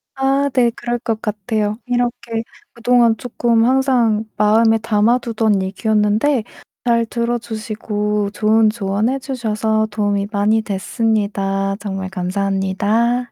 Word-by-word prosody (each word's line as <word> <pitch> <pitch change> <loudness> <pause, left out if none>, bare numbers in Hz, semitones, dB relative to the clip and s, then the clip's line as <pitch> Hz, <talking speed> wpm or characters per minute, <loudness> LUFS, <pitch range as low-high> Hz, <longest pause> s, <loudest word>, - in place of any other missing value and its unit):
아 270 +1 +1
네. 240 -2 +3
그럴 240 +1 -3
것 225 -2 -3
같아요. 210 0 -2
이렇게 240 -2 -2 0.3
그동안 235 -1 +3
쪼끔 235 -2 +1
항상 245 -4 +2
마음에 225 +2 +4
담아 225 +2 +2
두던 220 -4 0
얘기였는데 215 +6 +1 0.4
잘 235 -1 +2
들어 235 +1 -1
주시고 210 -2 -3
좋은 215 +1 +3
조언해 215 +4 -1
주셔서 220 -4 -1
도움이 205 -1 0
많이 215 +1 +2
됐습니다. 200 -1 -1
정말 195 -2 -4
감사합니다. 200 +5 0
220 Hz, 270 characters per minute, -18 LUFS, 205-235 Hz, 0.4 s, 마음에